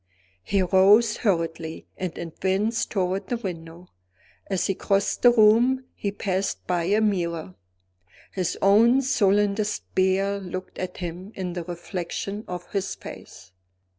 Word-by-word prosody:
He 190 - +1
rose 200 +5 +5
hurriedly, 165 -5 -2
and 185 -3 -5
advanced 190 +6 -1
toward 190 0 -1
the 240 - -1
window. 175 -4 -7 0.6
As 190 -2 0
he 195 - +1
crossed 200 +1 0
the 245 - +7
room, 240 +4 +4
he 200 - -3
passed 195 -1 -2
by 175 -2 0
a 205 +4 +2
mirror. 170 - -1 0.8
His 180 -2 -2
own 230 +7 +5
sullen 205 -4 +3
despair 200 -1 0
looked 185 -1 -7
at 185 - -5
him 180 +3 -6
in 180 -2 -4
the 175 -1 -4
reflection 180 +4 -5
of 180 -1 -7
his 195 -1 -2
face. 95 - -11
190 Hz, 135 wpm, -25 LUFS, 180-210 Hz, 0.8 s, the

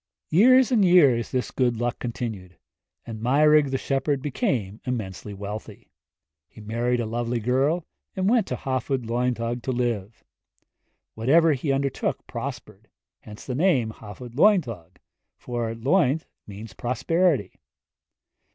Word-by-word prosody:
Years 255 +9 +6
and 225 -5 +4
years 145 -11 +5
this 125 -1 -2
good 120 -3 0
luck 120 +2 -2
continued, 115 -7 -5 0.5
and 110 -2 -7
Meirig 150 +4 +4
the 135 - -1
shepherd 135 +1 -1
became 120 -7 -2
immensely 105 -5 -5
wealthy. 100 +2 -8 0.6
He - - -16
married 120 +3 -1
a 120 - -1
lovely 120 +1 -2
girl, 135 +9 +1 0.3
and 190 0 0
went 225 -2 +3
to - - -2
the - - -12
Hafod 130 -1 -2
Lwyddog 120 0 -1
to 130 - -3
live. 115 -4 -3 0.9
Whatever 155 +8 +4
he 140 +1 -2
undertook 135 0 -1
prospered - - -7 0.3
hence 105 0 -12
the 130 - -4
name 130 -7 +2
Hafod 110 +3 -11
Lwyddog, 120 - +2 0.4
for 120 -2 -3
Lwydd 145 +4 +2 0.2
means 105 0 -9
prosperity. 135 - 0
125 Hz, 130 wpm, -24 LUFS, 115-145 Hz, 0.9 s, Years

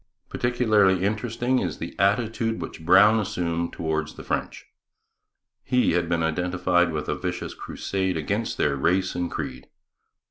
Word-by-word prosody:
Particularly 110 -7 +2
interesting 120 +4 0
is - - -3
the - - -7
attitude 110 +2 +1
which 80 - -7
Brown 100 +6 +6
assumed 85 -5 -2
towards 80 -1 -3
the - - -9
French. - - -3 1.0
He 125 -1 +2
had 85 0 0
been 85 -1 +1
identified 90 +1 +1
with 75 -1 -3
a - - 0
vicious 90 -1 -4
crusade 95 -2 -3
against 100 +9 -2
their 70 - +1
race 90 +7 +1
and 90 -1 -2
creed. 65 -4 -6
90 Hz, 140 wpm, -25 LUFS, 85-110 Hz, 1.0 s, Brown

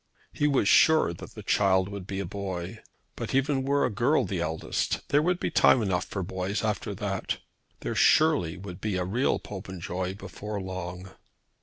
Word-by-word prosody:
He 150 - +1
was 135 -8 +2
sure 155 - +5
that - - -11
the - - -8
child 95 -2 +3
would 100 -2 -7
be 95 -1 -3
a 100 - -2
boy! 95 -2 -5 0.4
But - - -4
even 135 0 +2
were 140 +2 +2
a 125 - -1
girl 125 +4 +2
the 95 -2 -3
eldest, 80 -1 -2
there 145 - +4
would 175 +2 +1
be - - -2
time - - +5
enough 95 -3 0
for 95 - -4
boys 95 +4 -3
after 105 -5 -2
that. - - -2 0.4
There - - -2
surely 145 - +4
would 90 -1 -9
be 105 -3 -1
a 90 -1 -1
real 120 +9 +1
Popenjoy 95 -2 -5
before 100 +2 -6
long. 95 0 -6
100 Hz, 180 wpm, -27 LUFS, 90-125 Hz, 0.4 s, sure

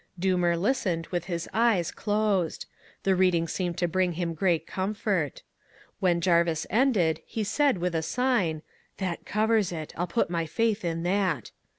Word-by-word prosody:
"Doomer 180 -2 +2
listened 185 -6 0
with 175 -1 -2
his 170 -2 -3
eyes 220 -7 +2
closed. 205 -5 0 0.4
The 195 - +3
reading 180 -3 +3
seemed 175 0 -2
to 175 - +1
bring 180 +1 +1
him 170 0 -2
great 170 0 +1
comfort. 190 - -2 0.6
When 175 -2 +2
Jarvis 170 -2 +2
ended 205 - +2
he 220 - -4
said 275 +3 +2
with 180 0 -1
a 160 - 0
sign, 185 -7 0 0.3
'That 185 -3 -4
covers 215 -2 +2
it. 160 -3 -6
I'll 175 +2 -2
put 175 -1 0
my 165 -2 -1
faith 220 +4 0
in 165 -1 -2
that.' 180 - 0
180 Hz, 160 wpm, -27 LUFS, 170-205 Hz, 0.6 s, The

